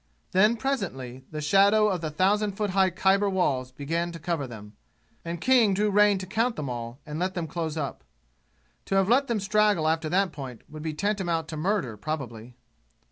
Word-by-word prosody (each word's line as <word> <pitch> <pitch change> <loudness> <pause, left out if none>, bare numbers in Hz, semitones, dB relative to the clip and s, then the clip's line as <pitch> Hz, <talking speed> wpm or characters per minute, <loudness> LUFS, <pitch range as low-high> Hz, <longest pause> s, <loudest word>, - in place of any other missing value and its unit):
Then 210 +5 +4
presently 135 - -3
the 155 -1 -5
shadow 200 +7 +4
of 185 -5 -1
the 160 - -2
thousand 200 +6 +1
foot 205 0 -2
high 190 0 +3
Khyber 195 +3 +2
walls 135 -9 0
began 165 +6 -2
to - - -6
cover 165 -4 -2
them, 105 -3 -10 0.5
and 170 0 -5
King 235 -3 +4
drew 210 +1 +1
rein 205 0 +5
to 185 - -5
count 230 +5 0
them 140 - -4
all 120 0 -6
and 150 0 -5
let 185 +1 -1
them 170 -2 -2
close 160 0 -4
up. 140 -3 -4 0.8
To 195 - -1
have 195 -1 +3
let 270 +4 +4
them 235 -3 0
straggle 205 -4 +2
after 160 0 0
that 190 +1 +2
point 130 -6 -8
would 155 +1 -9
be 155 -1 -4
tantamount 175 -3 -1
to 155 - -5
murder 155 - -1
probably. 125 -4 -6
175 Hz, 190 wpm, -26 LUFS, 150-205 Hz, 0.8 s, rein